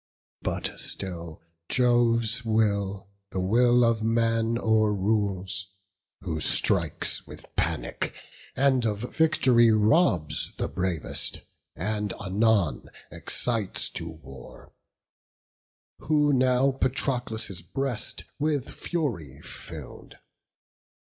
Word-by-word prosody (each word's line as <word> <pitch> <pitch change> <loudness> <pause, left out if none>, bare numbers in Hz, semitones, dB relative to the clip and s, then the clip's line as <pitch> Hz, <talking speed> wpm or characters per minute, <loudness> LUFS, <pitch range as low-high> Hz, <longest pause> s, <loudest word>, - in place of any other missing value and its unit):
But - - -3
still 85 -5 -4 0.3
Jove's 120 -2 +3
will 100 -3 0 0.2
the 95 - -3
will 120 +6 +4
of 115 -1 +2
man 115 0 +1
o'errules: 100 -3 +1 0.5
Who 80 -4 -3
strikes - - +1
with - - -13
panic, - - -1 0.4
and 130 -2 +3
of 105 -2 -1
vict'ry 130 -7 +4
robs 105 - +2
The - - -1
bravest; 90 -4 -2 0.3
and 105 +3 -2
anon 100 -3 +1 0.2
excites 115 -6 -1
to 80 - -6
war; 70 -5 -13 1.3
Who 150 -2 +2
now 130 +1 +3
Patroclus' 120 -7 -1
breast 125 +7 -3 0.2
with 145 -3 0
fury 95 - -3
fill'd. - - -9
110 Hz, 90 wpm, -27 LUFS, 95-125 Hz, 1.3 s, will